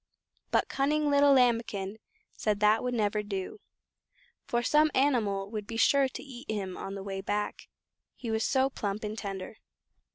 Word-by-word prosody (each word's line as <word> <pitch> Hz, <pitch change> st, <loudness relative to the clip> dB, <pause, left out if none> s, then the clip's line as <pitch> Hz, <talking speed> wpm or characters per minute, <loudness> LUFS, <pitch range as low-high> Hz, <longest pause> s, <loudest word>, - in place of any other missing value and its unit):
But -, -, +2 dB
cunning 295 Hz, +2 st, +1 dB
little 285 Hz, 0 st, +5 dB
Lambikin 230 Hz, -5 st, +1 dB, 0.4 s
said 210 Hz, -2 st, 0 dB
that 210 Hz, +1 st, +4 dB
would 250 Hz, -1 st, -2 dB
never 210 Hz, -1 st, +1 dB
do, 205 Hz, -, -5 dB, 0.9 s
for 240 Hz, 0 st, 0 dB
some 300 Hz, +4 st, +4 dB
animal 215 Hz, -8 st, +1 dB
would 210 Hz, -2 st, -5 dB
be 225 Hz, -, -5 dB
sure 275 Hz, +3 st, +4 dB
to -, -, -8 dB
eat 265 Hz, -1 st, -11 dB
him 195 Hz, -4 st, -3 dB
on 195 Hz, -, -6 dB
the 195 Hz, -, -6 dB
way 195 Hz, -1 st, -4 dB
back, 205 Hz, +1 st, -3 dB, 0.5 s
he 235 Hz, -3 st, -5 dB
was 220 Hz, 0 st, 0 dB
so 265 Hz, 0 st, +3 dB
plump 205 Hz, -3 st, -3 dB
and 210 Hz, 0 st, -3 dB
tender. 200 Hz, -1 st, -6 dB
220 Hz, 165 wpm, -29 LUFS, 205-260 Hz, 0.9 s, little